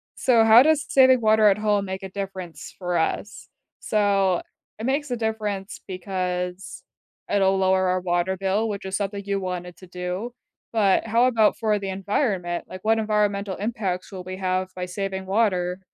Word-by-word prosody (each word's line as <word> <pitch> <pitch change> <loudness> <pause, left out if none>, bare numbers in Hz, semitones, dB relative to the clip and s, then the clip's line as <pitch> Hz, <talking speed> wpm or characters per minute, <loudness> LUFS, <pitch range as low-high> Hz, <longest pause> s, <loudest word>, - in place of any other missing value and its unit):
so 235 -3 +4
how 225 +2 +8
does 310 0 +2
saving 260 -2 +5
water 215 -1 +5
at 200 -1 +4
home 210 -2 +1
make 190 0 -5
a 190 - -6
difference 190 -5 -7
for 180 -2 -2
us? 200 +5 -2 0.3
So, 200 -4 +1 0.4
it 220 - -4
makes 280 +1 -1
a 245 - -1
difference 210 -3 -3
because 185 -1 -4 0.5
it'll 195 -1 +3
lower 190 0 +2
our 185 0 0
water 175 +1 0
bill, 195 +4 0
which 200 -2 -5
is 190 0 -2
something 200 0 -3
you 200 0 -1
wanted 180 -2 -5
to 185 - -14
do, 180 +6 -4 0.4
but 205 -3 +3
how 230 +2 +3
about 230 -4 +3
for 215 -2 +1
the 195 -1 -4
environment? 190 -2 -1
Like, 185 - -8
what 225 +1 +3
environmental 205 -2 0
impacts 200 -4 -3
will 185 -2 -7
we 185 +1 -7
have 185 0 -1
by 180 0 -3
saving 190 0 -4
water? 185 -3 +1
195 Hz, 175 wpm, -24 LUFS, 185-215 Hz, 0.5 s, how